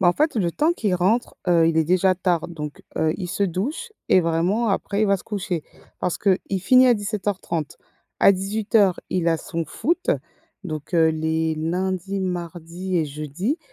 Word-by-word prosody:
Bah, 180 - +5
en - - +5
fait 305 - +1
le 175 -6 +1
temps 310 - +2
qu'il 205 - -1
rentre, 195 +7 +1
heu, 170 -2 +5
il 165 0 +1
est 160 - +4
déjà 185 +3 +3
tard 175 -2 0
donc 150 -3 -7
heu, 160 0 +2
il 180 -3 -5
se 200 - -2
douche 225 - -2 0.2
et 185 - +6
vraiment 175 +7 +1
après 200 +1 -1
il 215 - +3
va 200 - +3
se - - -13
coucher. 185 -6 -3 0.4
Parce 180 - -1
qu'il 195 -2 +3 0.2
finit 255 +7 +6
à 245 - +6
17:30. 200 -6 -3 0.4
À - - +8
18:00 200 0 +1
il 175 -2 0
a 165 - +3
son 165 +1 -4
foot, 325 - -1 0.5
donc 155 0 -5
heu, 160 -1 +5
les 160 0 0
lundis, 185 +4 -2
mardis 175 0 -4
et 160 - +2
jeudis. 155 - -3
185 Hz, 185 wpm, -23 LUFS, 165-205 Hz, 0.5 s, À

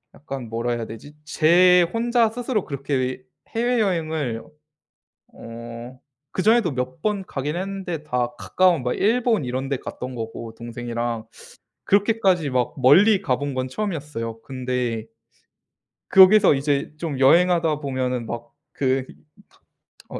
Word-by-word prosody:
약간 135 -5 -7
뭐라 115 +1 -2
해야 120 -1 -3
되지? 115 +7 -11
제 180 +3 +5
혼자 235 0 +2
스스로 235 -2 -2
그렇게 130 -2 -3 0.3
해외여행을 170 - -1 0.9
어 115 +2 -9 0.3
그 - - -1
전에도 220 -5 +3
몇 130 +5 -4
번 205 -3 -1
가긴 145 +4 -3
했는데 185 -4 -4
다 125 -5 -1
가까운 180 -6 +2
막 125 - 0
일본 230 - +1
이런 130 +2 -3
데 140 - 0
갔던 125 +1 -7
거고 115 -1 -6
동생이랑. 120 0 -4 0.6
그렇게까지 195 -6 +2
막 125 -2 0
멀리 190 - +5
가 130 -8 0
본 145 0 -4
건 130 0 -2
처음이었어요. 145 - -4
근데 125 -3 -3 1.0
거기서 190 -3 +7
이제 140 +1 -1
좀 155 -4 -4
여행하다 165 +2 +4
보면은 130 -3 -2
막 120 0 -6 0.2
그 130 -1 0
이 - - -13 0.9
어 - - -6
140 Hz, 260 characters per minute, -23 LUFS, 125-185 Hz, 1.0 s, 거기서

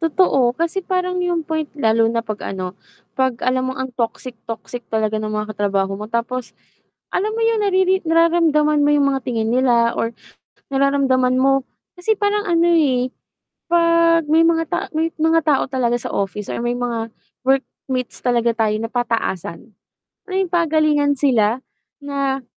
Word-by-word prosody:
Totoo, 285 -7 +2
kasi 335 +3 -1
parang 365 0 -1
yung 345 -3 -1
point 315 -1 -2
lalo 225 -3 +3
na 230 0 -1
'pag 215 -1 -5 0.2
ano 185 -1 -4 0.4
'pag 260 -2 0
alam 255 0 +1
mong 260 - -4
ang 260 - -7
toxic, 235 +2 -3 0.2
toxic 230 +2 -6
talaga 220 -1 0
ng 215 - -3
mga 215 0 -3
katrabaho 195 -1 0
mo 210 +2 -6
tapos 235 +2 -3 0.6
alam 415 +3 0
mo 460 - -2
yung 455 -1 +2
nariri 380 -1 +2
nararamdaman 325 -3 +3
mo - - +3
yung 285 -1 +3
mga 270 - -1
tingin 225 -2 -1
nila 240 -2 +3
or 230 - -1 0.6
nararamdaman 270 -2 +2
mo 270 +1 +3 0.4
kasi 430 +5 +1
parang 415 0 0
ano, 335 0 +3
eh, 260 -6 +2 0.6
'pag 335 -1 +4
may 325 +1 +5
mga 330 0 +3
ta - - -1 0.2
may 320 +1 +1
mga 325 +1 +3
tao 290 -3 +2
talaga 245 -3 +1
sa - - -6
office 200 +1 -3
or - - -3
may 240 0 0
mga 235 -2 -3 0.4
workmates 265 -1 -1
talaga 240 -1 +2
tayo 220 -2 +1
na 225 +1 -4
pataasan, 230 -5 -3 0.6
alam - - -14
mo 375 +1 0
yung - - -16
pagalingan 310 -3 +2
sila 245 -3 +2 0.4
na 275 -1 -2
265 Hz, 165 wpm, -20 LUFS, 230-330 Hz, 0.6 s, may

